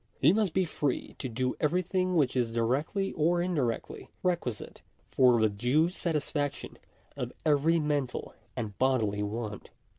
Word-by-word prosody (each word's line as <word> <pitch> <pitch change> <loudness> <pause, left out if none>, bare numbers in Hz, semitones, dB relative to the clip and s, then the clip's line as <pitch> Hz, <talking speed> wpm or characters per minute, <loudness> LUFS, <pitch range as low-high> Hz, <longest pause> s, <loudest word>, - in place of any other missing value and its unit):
He 150 +6 +5
must 205 -5 +1
be 185 -1 +3
free 145 -4 -2
to 130 - -3
do 125 +2 -1
everything 180 +3 +1
which 140 -6 +2
is 120 -3 +1
directly 135 - 0
or 170 +3 +2
indi 175 -4 0
rectly 115 -2 -3 0.2
requisite 170 - -2 0.3
for 125 -3 +5
the 110 - +4
due 125 +11 +2
satisfaction 150 -5 -2 0.4
of - - -4
every 155 +2 +3
mental 145 -4 -2 0.2
and 110 -5 -4
bodily 115 -6 +1
want. 105 0 -4
145 Hz, 145 wpm, -29 LUFS, 120-170 Hz, 0.4 s, He